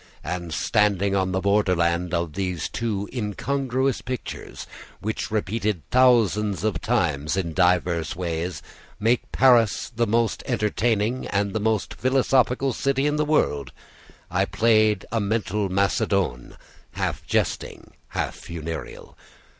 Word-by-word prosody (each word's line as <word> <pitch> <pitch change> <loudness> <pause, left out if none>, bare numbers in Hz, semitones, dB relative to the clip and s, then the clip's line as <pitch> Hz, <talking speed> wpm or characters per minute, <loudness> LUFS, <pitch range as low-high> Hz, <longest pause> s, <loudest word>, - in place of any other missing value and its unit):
And, 85 -2 -4
standing 100 +3 +1
on 95 -1 +1
the 95 0 0
borderland 90 -4 +1
of 85 -3 -1
those 90 -4 -2
two 105 -4 -2
incongruous 130 +3 -1
pictures, 125 -1 -6 0.3
which 110 +2 -3
repeated 105 -4 -1
thousands 110 -6 +3
of 105 -6 -1
times 85 - 0
in 85 -4 -2
diverse 90 -2 +1
ways, 85 0 -3 0.4
make 115 +3 +1
Paris 120 -5 +4
the 115 0 +1
most 115 +1 +1
entertaining 110 +2 0
and 100 0 -1
most 110 -2 0
philosophical 130 0 +2
city 135 +3 0
in 150 0 +1
the 150 - +1
world, 75 - +1 0.6
I - - +2
played 110 -3 +2
a 115 -1 0
mental 105 -1 -1
_macedoine_[*], 95 -7 0 0.4
half - - -2
jesting, - - -2 0.2
half - - -3
funereal. 80 -1 -7
105 Hz, 120 wpm, -24 LUFS, 90-115 Hz, 0.6 s, Paris